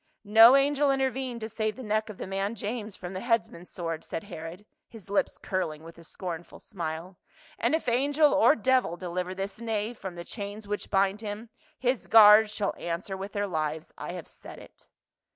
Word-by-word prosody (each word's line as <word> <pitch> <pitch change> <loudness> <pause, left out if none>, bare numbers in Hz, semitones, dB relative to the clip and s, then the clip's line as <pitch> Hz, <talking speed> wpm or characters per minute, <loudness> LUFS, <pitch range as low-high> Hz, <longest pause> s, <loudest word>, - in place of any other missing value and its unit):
" - - -61 0.2
No 235 +4 +11
angel 285 +1 +3
intervened 265 -3 -1
to 220 - -3
save 215 -1 -2
the 260 - -8
neck 215 0 -1
of 210 - -8
the - - -5
man' 195 +3 -2
James 215 0 -5
from 180 +1 -8
the 185 - -4
headsman's 225 -5 -1
sword," 165 -2 -4
said 220 - -5
Herod, 175 0 -9 0.2
his 215 -4 -13
lips 200 - +1
curling 165 -5 -3
with 165 +1 -12
a - - -13
scornful 170 -1 -7
smile, 170 0 -6 0.2
" - - -25
and - - +2
if 320 - -3
angel 285 +5 +3
or 290 +1 +5
devil 250 - +1
deliver 180 +1 -4
this 195 +3 -5
knave 225 0 -2
from 190 -3 -6
the 170 0 -7
chains 205 +1 -7
which 205 0 -4
bind 195 +1 +1
him, 215 +1 -6 0.3
his 250 -1 -1
guards 215 -1 +8
shall 210 -1 -1
answer 175 +4 -4
with 195 +2 -7
their 205 0 0
lives. 155 -3 -3
I 175 - -6
have 180 -3 -7
said - - -12
it." - - -15
205 Hz, 200 wpm, -28 LUFS, 180-230 Hz, 0.3 s, No